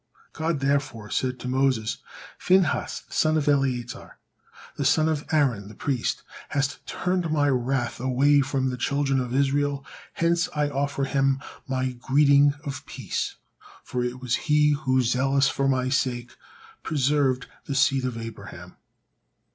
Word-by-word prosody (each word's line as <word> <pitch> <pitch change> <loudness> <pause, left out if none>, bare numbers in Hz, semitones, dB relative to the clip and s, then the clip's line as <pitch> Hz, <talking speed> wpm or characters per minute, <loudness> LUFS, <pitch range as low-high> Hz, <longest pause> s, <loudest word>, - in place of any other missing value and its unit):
God 160 -2 -1
therefore 135 -7 -1
said 130 +4 -1
to - - -5
Moses, 130 -4 +1 0.4
"Phinehas 185 0 +2
the - - -16
son 155 0 +2
of 150 - -1
Eleazar, 130 -4 -1 0.6
the 145 - -2
son 155 +4 +3
of 155 -2 -1
Aaron 130 -10 +1
the 105 - -12
priest, 130 -1 -2 0.3
hast 140 0 -1
turned 180 -3 -1
My 145 -2 +2
wrath 125 -2 -1
away 135 +3 +3
from 135 -1 -1
the 125 - -4
children 135 +1 0
of 125 -2 -3
Israel, 140 0 +1 0.3
hence 170 +1 +1
I 150 -1 +1
offer 140 0 -1
him 135 0 +1 0.3
My 130 -1 -1
greeting 140 +3 +4
of 140 -1 -5
peace, - - -4 0.5
for 125 -1 -3
it 125 +1 -3
was 125 -2 -3 0.2
he 150 0 +5
who, 130 -3 +1
zealous 135 +3 +2
for 135 0 0
My 130 -1 +1
sake, 125 -3 -1 0.5
preserved 140 -3 +1 0.2
the 140 - -3
seed 135 0 +3
of 125 -2 -2
Abraham." 115 -1 -9
135 Hz, 145 wpm, -25 LUFS, 130-145 Hz, 0.6 s, he